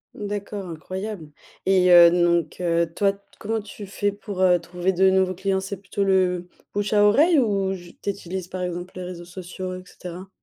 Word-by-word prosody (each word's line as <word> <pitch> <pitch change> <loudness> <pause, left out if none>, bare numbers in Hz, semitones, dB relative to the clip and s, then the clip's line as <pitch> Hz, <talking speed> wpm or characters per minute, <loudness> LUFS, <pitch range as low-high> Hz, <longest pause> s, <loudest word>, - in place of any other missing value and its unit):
D'accord, 205 -1 -5
incroyable 185 +1 -6 0.4
et 185 -1 +4
heu, 175 -1 +9
donc 170 -2 +2
heu, 170 -1 +1
toi 195 +2 +2
t 200 - -19 0.2
comment 220 +1 -2
tu 205 0 -9
fais 205 +1 -1
pour, 200 -2 -6
heu, 180 -2 +5
trouver 175 +2 -2
de 190 +1 +4
nouveaux 190 -1 +2
clients, 190 +1 -1
c'est 195 +1 -5
plutôt 200 +1 -3
le 185 -2 +2 0.3
bouche 205 0 -1
à 205 -1 +4
oreille 300 +10 +5
ou 195 -5 +1
j 175 -2 -11
tu - - -1
utilises 190 -2 -5
par 185 0 -5
exemple 180 0 -4
les 185 - -5
réseaux 180 -1 -7
sociaux 185 +1 -7
et 185 - -9
cetera? 180 +1 -9
185 Hz, 195 wpm, -24 LUFS, 175-200 Hz, 0.4 s, heu